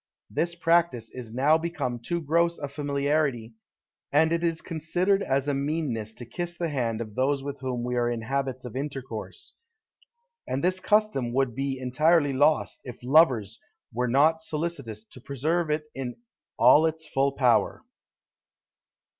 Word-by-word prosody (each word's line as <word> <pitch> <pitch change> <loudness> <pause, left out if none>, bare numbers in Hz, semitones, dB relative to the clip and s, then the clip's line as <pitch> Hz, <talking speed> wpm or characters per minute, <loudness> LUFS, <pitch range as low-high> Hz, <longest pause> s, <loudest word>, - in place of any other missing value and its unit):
This 170 +10 -1
practice 165 -9 +1
is 120 -3 -8
now 145 +7 +3
become 160 -8 -3
too 170 +9 -3
gross 170 +3 +1
a 145 - -4
familiarity, 140 -4 -1 0.6
and 160 +3 +4
it 170 0 0
is 165 -1 0
considered 175 +4 0
as 135 -4 0
a 145 - +1
meanness 135 -7 -2
to 120 - -8
kiss 175 +9 -4
the 170 -1 -1
hand 120 -6 -1
of 110 -2 -6
those 135 +3 0
with 140 0 -5
whom 125 -2 -3
we 125 0 -2
are 120 -1 +1
in 120 -1 -3
habits 130 0 -2
of 125 - -8
intercourse; 135 - -6 0.9
and 135 +4 -2
this 185 +1 +2
custom 205 - +1
would 135 -2 +1
be 135 +2 -2
entirely 145 +3 +2
lost, 145 +4 +2
if 125 - -8
lovers 125 - +3 0.3
were 125 +2 0
not 155 +6 +3
solicitous 150 -10 -4
to 120 +2 -14
preserve 155 +6 -1
it 150 0 0
in 130 -2 -5 0.4
all 155 +2 +6
its 160 0 -5
full 140 -1 +1
power. 125 -4 +2
140 Hz, 155 wpm, -26 LUFS, 125-160 Hz, 0.9 s, all